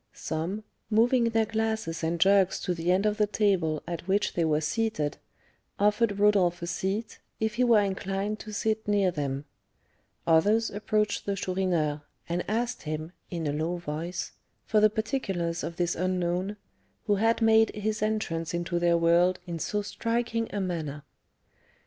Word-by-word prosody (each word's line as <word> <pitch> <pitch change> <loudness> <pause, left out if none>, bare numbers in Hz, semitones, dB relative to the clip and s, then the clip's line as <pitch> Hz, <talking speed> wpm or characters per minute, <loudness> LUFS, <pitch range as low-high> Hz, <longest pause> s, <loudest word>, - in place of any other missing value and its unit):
Some, 170 +7 -3 0.3
moving 235 +3 +4
their 225 -1 +2
glasses 220 -7 -2
and 165 +1 0
jugs 190 +1 +4
to 180 - -1
the 170 +1 0
end 190 +3 +2
of 210 0 +1
the 210 -1 +3
table 185 -8 +1
at 170 +1 -5
which 200 +2 +1
they 170 - +1
were 155 -2 +2
seated, 160 -2 -1 0.6
offered 210 0 +2
Rodolph 195 -4 +3
a - - -1
seat, 195 +5 -3 0.2
if 220 -1 0
he 245 +3 +1
were 230 -4 +5
inclined 195 +2 -2
to 215 - -8
sit 220 +1 -1
near 200 -3 +3
them; 140 -3 -3 0.8
others 205 +8 +3
approached 210 0 -1
the 200 - 0
Chourineur, 180 -6 0 0.3
and 175 +1 -1
asked 235 +3 -1
him, 155 +1 -4 0.2
in 170 -3 -3
a 145 - 0
low 160 +4 -1
voice, 170 +2 -4 0.3
for 215 - +3
the 215 0 +6
particulars 195 -7 -2
of 170 - -4
this 175 0 0
unknown, 185 +2 -1 0.5
who 205 -2 +2
had 225 +3 +2
made 225 -1 +5
his 215 0 -2
entrance 175 -7 -1
into 175 0 -1
their 170 0 +3
world 170 +2 +4
in 170 -2 -5
so 205 +5 -1
striking 230 +1 -1
a 205 - -2
manner. 160 -6 -3
195 Hz, 160 wpm, -28 LUFS, 170-215 Hz, 0.8 s, the